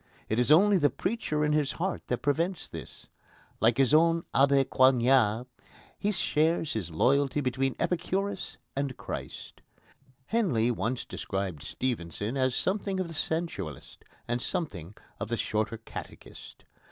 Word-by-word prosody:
It 110 - +1
is 125 - +2
only 195 +4 +6
the 145 -2 +4
preacher 155 -8 -1
in 150 - +1
his 150 -2 +1
heart 185 +2 -3
that 125 - -2
prevents 165 +5 0
this. - - -10 0.5
Like 115 +2 +3
his 135 0 +3
own 165 +1 +4
Abbé 140 0 +4
Coignard, 125 -3 +4 0.5
he 210 - 0
shares 165 -3 +1
his 100 -6 -3
loyalty 135 - +2
between 130 0 0
Epicurus 190 +3 -2 0.2
and 140 -2 -2
Christ. - - -7 0.6
Henley 140 - +1
once 120 +1 -2
described 95 -6 -4
Stevenson 105 - -3
as 130 -2 +1
something 195 0 -1
of 185 -2 -2
the - - -6
sensualist, 160 - -3 0.2
and 120 +1 -1
something 105 - -4 0.2
of 100 - -3
the 120 - -1
Shorter 110 +1 -1
Catechist. 115 - -10
135 Hz, 140 wpm, -29 LUFS, 115-165 Hz, 0.6 s, only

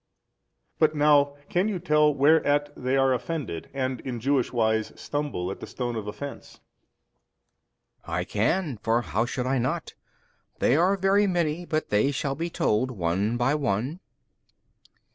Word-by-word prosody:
But 155 -1 +3
now, 145 -1 +4
can 180 +4 +1
you 210 -3 -1
tell 150 -3 +3
whereat 145 0 +3
they 130 +1 0
are 135 -1 +3
offended 125 - -4
and 130 -2 -2
in 125 -3 -5
Jewish 135 +1 +1
wise 110 -2 +1
stumble 145 -12 -3
at - - -7
the - - -8
stone 120 -2 -4
of 110 -2 -4
offence? 140 +7 -7 1.5
B. - - -8
I 90 +2 0
can, 120 - 0
for 115 +3 0
how 115 +1 -1
should 125 +1 -3
I 130 0 +1
not? 145 +7 -2 0.6
they 130 - +3
are 185 +5 +3
very 195 +2 +3
many, 175 -2 -1
but 155 0 -1
they 105 +6 +3
shall 140 0 -2
be 165 +5 -3
told 130 -5 +1
one 100 +1 -1
by 120 +4 +2
one. 135 - -1
135 Hz, 155 wpm, -26 LUFS, 115-155 Hz, 1.5 s, now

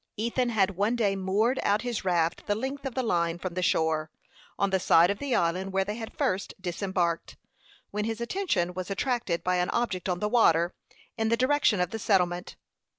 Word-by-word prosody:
Ethan 235 +3 0
had 200 -4 +2
one 210 +4 +1
day 205 -5 +1
moored 200 +7 +1
out 205 +3 +1
his 245 -2 -3
raft 170 -3 0
the 205 - +1
length 270 +5 -4
of 250 - -7
the 260 - 0
line 170 -6 0
from 180 0 -5
the 185 - -2
shore, 160 -2 +1 0.5
on 200 -1 +1
the 190 - +2
side 175 0 +5
of 200 - -4
the 280 -3 -1
island 180 +3 0
where 195 0 +1
they 210 - -3
had 225 0 -8
first 185 +1 -1
disembarked, 180 -2 -2 0.5
when 210 +1 -2
his 225 0 -3
attention 235 - -1
was 185 +1 -5
attracted 210 -4 -1
by 180 0 +1
an 180 0 0
object 195 -7 -1
on 180 - 0
the 210 - -1
water, 175 -7 +3 0.5
in 220 0 +1
the 230 - +2
direction 260 -5 +3
of 180 -1 0
the 225 - -4
settlement. 180 -4 +1
195 Hz, 205 wpm, -28 LUFS, 180-230 Hz, 0.5 s, side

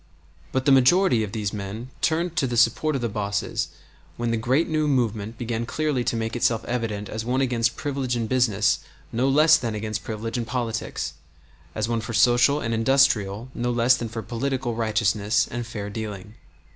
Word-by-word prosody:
But 130 0 -1
the 140 - +5
majority 135 0 +5
of 105 - -5
these 105 -2 -3
men 105 +5 -6
turned 170 +1 0
to 135 - +2
the 120 -1 -2
support 125 +6 +3
of 135 - -2
the - - +1
bosses 100 -2 -2 0.5
when 120 -1 -1
the - - +1
great 130 +8 +1
new 155 -2 0
movement 115 -5 -1
began 115 -1 -3
clearly 150 -4 -1
to - - 0
make 115 +1 -2
itself 115 -1 +1
evident 110 -4 -3
as 110 0 -4
one 125 +3 0
against 120 -3 +1
privilege 135 -3 -2
in 115 -1 -1
business 110 -4 +2 0.3
no 125 +4 +1
less 155 +3 +6
than 115 -6 -3
against 110 0 -4
privilege 115 +2 -4
in 115 - -2
politics, 115 0 -3 0.6
as 110 +1 -1
one 115 -1 -1
for 115 +1 -6
social 125 +5 +4
and 115 -4 -2
industrial 115 -3 +2
no 120 +1 -2
less 120 +1 +4
than 115 - -4
for 110 0 -5
political 130 0 -2
righteousness 110 -1 +1
and 120 0 -4
fair 105 -3 -5
dealing. 105 -1 -6
115 Hz, 185 wpm, -24 LUFS, 110-130 Hz, 0.6 s, less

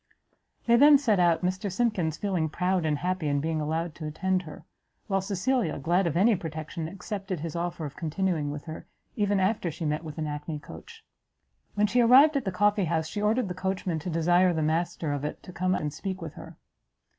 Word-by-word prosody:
They 235 0 +5
then 290 +2 +8
set 225 -8 +1
out, 170 -2 +3
Mr 185 +2 -2
Simkins 185 -7 0
feeling 180 -6 -1
proud 180 +1 0
and 150 -1 +1
happy 180 +1 -2
in 145 -1 +1
being 160 +1 -1
allowed 160 +2 -2
to 155 -1 -7
attend 185 +4 0
her, 155 -4 -11 0.4
while 195 -2 0
Cecilia, 200 0 0
glad 170 +6 +1
of 165 0 -1
any 215 +4 +5
protection, 160 -1 -5
accepted 195 -1 -5
his 165 0 -5
offer 170 -1 -3
of 145 - -7
continuing 165 -2 -1
with 145 0 -6
her, 160 +1 -8 0.3
even 205 -2 +1
after 190 -1 +1
she 165 +1 -5
met 150 +1 -1
with 155 -1 -8
an 155 - -2
hackney 150 +1 -4
coach. 450 - -12 0.7
When 205 0 +3
she 245 +4 +2
arrived 270 +6 +7
at 275 - 0
the 190 - -1
coffee 205 +1 +2
house, 160 -1 0
she 205 +6 -4
ordered 215 +2 +1
the 180 - -3
coachman 185 -2 -2
to 165 - -5
desire 175 +2 +3
the 160 -1 -1
master 160 -1 -1
of 145 -1 -3
it 150 - -5
to 180 - -11
come 185 +1 0
and 150 -3 -3
speak 190 +1 -5
with 160 -3 -7
her. - - -11
175 Hz, 210 wpm, -27 LUFS, 160-195 Hz, 0.7 s, then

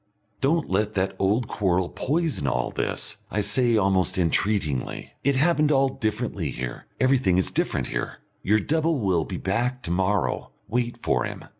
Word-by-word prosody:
"Don't 155 +4 +2
let 105 +3 0
that 95 0 0
old 105 +5 +2
quarrel 95 -3 0
poison 150 - -1
all 60 -2 0
this," - - -3
I 105 - 0
say 120 +2 +2
almost 95 -3 +2
entreatingly. 85 - 0
"It 140 0 +2
happened 150 +1 +3
all 135 -1 +4
differently 110 -5 -2
here 65 -1 -6
everything 130 -8 +3
is 95 - +1
different - - 0
here. - - -3 0.2
Your 105 +3 +3
double 160 +7 +1
will 95 - +1
be - - -5
back 120 +6 -1
to 85 - -3
morrow. 95 +3 0
Wait 120 0 -1
for - - +1
him. - - -7
105 Hz, 160 wpm, -25 LUFS, 95-130 Hz, 0.2 s, all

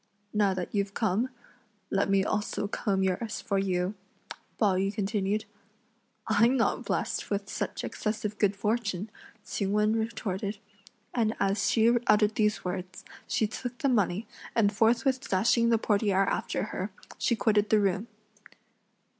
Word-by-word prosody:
"Now 205 -2 +2
that 180 -2 -4
you've 200 -1 -1
come, 220 +3 +1 0.6
let 195 0 +1
me 195 -1 +4
also 210 -1 -1
comb 200 -2 0
yours 190 +4 -1
for 200 -3 -1
you," 185 0 0 0.6
Pao 205 -4 +3
yü 195 +2 +1
continued. 205 0 -1 0.8
"I'm 240 +3 +4
not 230 - +1
blessed - - -2
with 200 -1 -2
such - - -3
excessive 215 -1 -3
good 205 -1 +3
fortune!" 210 -1 -1 0.3
Ch'ing 200 0 -2
Wen 210 +1 +3
retorted, 215 -3 -2 0.6
and 225 -2 +1
as 195 +1 +1
she 230 +1 +4
uttered 210 0 +4
these 210 -3 +1
words, 180 0 -5 0.2
she 220 - +1
took 245 +3 -5
the 280 0 +1
money, 205 -3 +1 0.3
and 210 -2 +3
forthwith 235 +5 +2
dashing 230 +5 +3
the 230 - +4
portiere 200 -3 +2
after - - -1
her, 190 +3 -3 0.3
she 235 - +2
quitted 210 -2 +2
the 215 - +5
room. 200 +2 0
210 Hz, 145 wpm, -29 LUFS, 195-225 Hz, 0.8 s, the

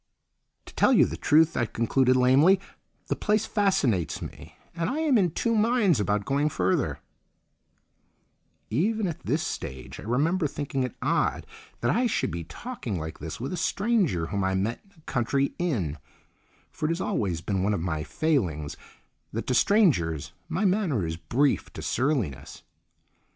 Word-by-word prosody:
"To - - -13
tell - - +4
you - - +6
the - - -4
truth," 160 +2 +3
I 120 - +1
concluded 130 +3 +2
lamely, 135 +9 +5 0.5
"the - - -1
place 215 0 +1
fascinates 140 - +1
me - - -9 0.2
and 165 +1 -2
I 275 - -2
am 300 -5 +3
in 190 -6 +4
two 230 +8 -1
minds 215 - +3
about 105 0 0
going 140 +2 +1
further—" 95 -8 0 1.7
Even 210 - +1
at 170 -4 -3
this - - -1
stage 65 -1 -6
I - - -8
remember 150 - +1
thinking 140 -1 -3
it 125 -3 -3
odd - - +1 0.4
that 120 - +2
I 245 - +2
should - - -1
be 85 0 -4
talking 180 - -5
like 80 +1 -6
this 80 +7 -6
with 130 +7 -4
a - - -3
stranger 190 - +1
whom 100 +3 -2
I 95 0 +1
met 105 +5 -1
in 200 - -27
a - - -20
country 135 0 0
inn, 100 - -1 0.7
for 155 - -2
it - - -2
has 165 +1 -1
always 100 - -1
been 95 +1 -1
one 100 +2 +1
of - - -2
my 80 -3 -2
failings 90 - -1 0.6
that 115 - -4
to 130 - 0
strangers 90 - +2 0.2
my 175 +6 0
manner 180 - +1
is 80 0 -3
brief 135 - 0
to - - -7
surliness. 115 - -1
135 Hz, 165 wpm, -26 LUFS, -, 1.7 s, you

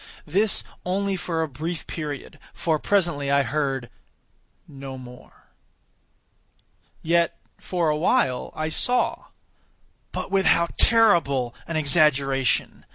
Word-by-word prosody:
This 200 +7 +1 0.2
only 195 +2 -1
for 165 -3 -2
a - - -2
brief 155 +4 -5
period, 150 -4 -6 0.2
for 160 -2 0
presently 170 -9 0
I 140 0 +3
heard 135 -3 -2 0.8
no 135 -2 -9
more. 125 -1 -14 1.5
Yet, 170 +1 +1 0.2
for 175 -3 -1
a 150 - +1
while, 130 -5 +1
I 155 0 -2
saw—but 245 -1 -3
with 195 -1 +2
how 170 0 +3
terrible 165 - +4
an 165 - -2
exaggeration! 140 -4 +2
155 Hz, 105 wpm, -24 LUFS, 140-175 Hz, 1.5 s, terrible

